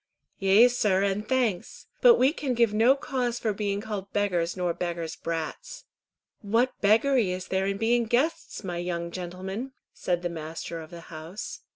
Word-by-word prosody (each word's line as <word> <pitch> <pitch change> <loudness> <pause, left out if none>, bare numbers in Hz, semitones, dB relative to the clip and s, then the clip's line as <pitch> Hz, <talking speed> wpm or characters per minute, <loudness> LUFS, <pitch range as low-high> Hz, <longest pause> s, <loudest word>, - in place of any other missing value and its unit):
"Yea, 200 +4 +6
sir, 210 -6 +1
and 200 +2 -1
thanks; 240 -9 -1 0.2
but 485 -2 +8
we 265 +4 +3
can 270 -6 -2
give 230 -3 +3
no 230 +5 +5
cause 250 -3 -2
for 220 -3 -1
being 200 0 -2
called 205 -2 -5
beggars 180 -4 0
nor 180 -2 0
beggars' 170 -2 -4
brats." - - -5 0.6
"What 230 +5 +1
beggary 225 +1 +4
is 180 0 -4
there 190 0 0
in 195 0 -1
being 235 +2 +2
guests, 290 +6 -1
my 175 -2 -4
young 170 -1 -3
gentlemen?" 190 +8 -5 0.2
said 175 -1 -2
the - - +1
master 165 0 -6
of 155 - -11
the 170 -1 -10
house. 165 +8 -7
200 Hz, 170 wpm, -27 LUFS, 175-240 Hz, 0.6 s, but